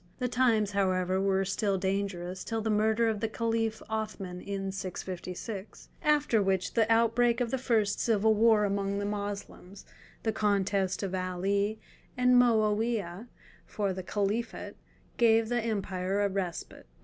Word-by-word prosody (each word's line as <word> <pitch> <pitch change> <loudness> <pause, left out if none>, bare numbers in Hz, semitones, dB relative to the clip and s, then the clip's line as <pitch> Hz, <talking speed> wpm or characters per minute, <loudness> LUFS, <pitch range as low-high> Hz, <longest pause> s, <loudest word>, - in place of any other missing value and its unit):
The 250 - -1
times, 230 -4 +2
however, 185 -1 +1
were 195 0 +1
still 200 +1 0
dangerous 190 -1 -2
till 225 -1 -2
the 220 0 -1
murder 220 +2 +2
of 220 -2 0
the 225 - 0
Caliph 225 0 -1
Othman 215 -4 -4
in 195 -1 -4
656, 190 +2 -6
after 295 -7 +3
which 190 -2 0
the 225 -1 +2
outbreak 230 +1 +3
of 240 -2 -1
the 265 - -1
first 220 -5 +1
civil 220 -1 +3
war 215 -1 +4
among 200 0 -1
the 200 - -2
Moslems—the 205 +1 -6
contest 200 -2 0
of 190 -1 -3
Ali 195 +3 -1 0.4
and 250 0 +4
Moawiah 220 -4 +2 0.4
for 200 -3 -1
the 185 - -5
Caliphate—gave 220 +2 -1
the 240 0 +1
empire 200 -3 -1
a 200 - +2
respite. 185 - -5
205 Hz, 135 wpm, -29 LUFS, 195-225 Hz, 0.4 s, war